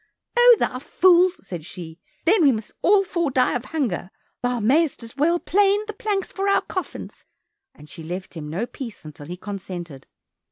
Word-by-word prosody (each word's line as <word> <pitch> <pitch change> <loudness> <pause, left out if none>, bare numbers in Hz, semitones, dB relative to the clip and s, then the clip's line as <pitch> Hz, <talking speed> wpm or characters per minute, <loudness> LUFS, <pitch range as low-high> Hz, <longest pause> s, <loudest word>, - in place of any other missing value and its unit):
"O, 485 0 +8
thou 255 - -1
fool!" 360 +5 +4
said 175 -5 -7
she, 165 -1 -9 0.3
"Then 395 +3 +4
we 285 -4 +6
must 220 -3 -4
all 395 +1 +5
four 340 -4 -1
die 255 -1 +2
of 245 0 -3
hunger, 245 - -2 0.3
thou 245 0 0
mayest 275 +5 +2
as 230 +1 -11
well 320 +5 +2
plane 405 +3 +2
the 430 - -6
planks 410 -2 -2
for 390 +1 -1
our 395 - +4
coffins," 370 - -6 0.5
and 150 - -15
she 165 - -10
left 180 +4 -6
him 155 -4 -7
no 185 +9 -2
peace 240 - -9
until 150 -1 -10
he 180 +2 -6
consented. 180 -8 -7
250 Hz, 185 wpm, -23 LUFS, -, 0.5 s, O